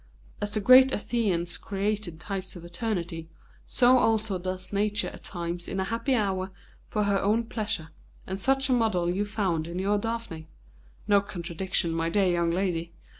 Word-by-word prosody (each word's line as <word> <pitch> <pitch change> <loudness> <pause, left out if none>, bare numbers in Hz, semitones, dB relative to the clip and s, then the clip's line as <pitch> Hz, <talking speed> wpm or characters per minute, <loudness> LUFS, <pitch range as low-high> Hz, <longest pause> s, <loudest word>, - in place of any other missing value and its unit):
As 205 - -1
the 210 +1 -1
great 255 +5 +7
Athenians 195 -8 0
created 200 -4 -2
types 190 +1 -4
for 170 -2 -10
eternity, 170 -3 -3 0.4
so 250 +1 +5
also 220 -4 +1
does 185 +2 -5
Nature 210 +1 +1
at - - -12
times 175 -1 -4
in 195 - -3
a - - +1
happy 230 +6 0
hour, 190 -4 0 0.4
for 210 - 0
her 200 -1 +2
own 215 +4 +2
pleasure, 215 -8 -3 0.4
and 190 +1 -4
such 270 +5 +2
a 260 - +2
model 200 -8 +2
you 200 +3 0
found 190 -7 -1
in 180 +3 -3
our 205 +1 +2
Daphne. 225 -8 -4 0.6
No 205 -1 +5
contradiction, 175 -2 -2
my 165 0 0
dear 200 +2 +2
young 170 -1 +1
lady! 170 -2 -1
195 Hz, 170 wpm, -27 LUFS, 175-215 Hz, 0.6 s, great